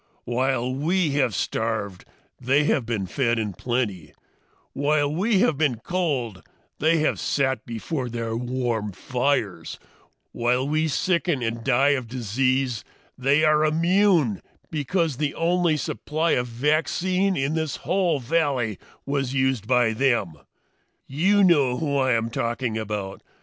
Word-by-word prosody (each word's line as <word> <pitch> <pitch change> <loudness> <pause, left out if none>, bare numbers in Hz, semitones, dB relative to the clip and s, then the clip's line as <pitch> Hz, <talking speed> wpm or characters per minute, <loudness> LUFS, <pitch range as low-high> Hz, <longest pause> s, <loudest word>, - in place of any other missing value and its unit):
"While 125 +1 0
we 160 +4 +1
have 135 -7 +1
starved, 110 -5 -2 0.3
they 135 +4 +2
have 140 -5 +1
been 110 -5 -2
fed 120 +5 0
in 105 -3 -2
plenty; 100 - -3 0.6
while 145 +1 +1
we 195 +4 +2
have 150 - +2
been 145 -6 +2
cold, 130 - -2 0.4
they 160 +2 +3
have 155 - 0
sat 130 -2 -1
before 125 +3 -4
their 115 -1 -3
warm 120 -4 -2
fires; 120 - -2 0.5
while 125 +3 0
we 155 +2 +1
sicken 170 -2 0
and 115 0 -3
die 135 +5 +3
of 130 -5 0
disease, 130 +1 -1 0.3
they 140 +4 +2
are 155 0 +4
immune 165 - +2 0.3
because 160 -1 -1
the 145 0 -1
only 170 -1 +1
supply 155 +3 -2
of 125 0 +1
vaccine 170 +9 0
in 135 +3 0
this 160 -2 -2
whole 180 -5 +1
valley 130 - 0 0.3
was 135 -2 -2
used 130 -5 0
by 120 -2 +3
them. 115 -8 +1 0.7
"You 190 +9 +2
know 145 -9 +4
who 145 -2 -1
I 130 -2 +2
am 115 0 -1
talking 115 0 -2
about! 105 -3 -4
130 Hz, 135 wpm, -24 LUFS, 115-155 Hz, 0.7 s, are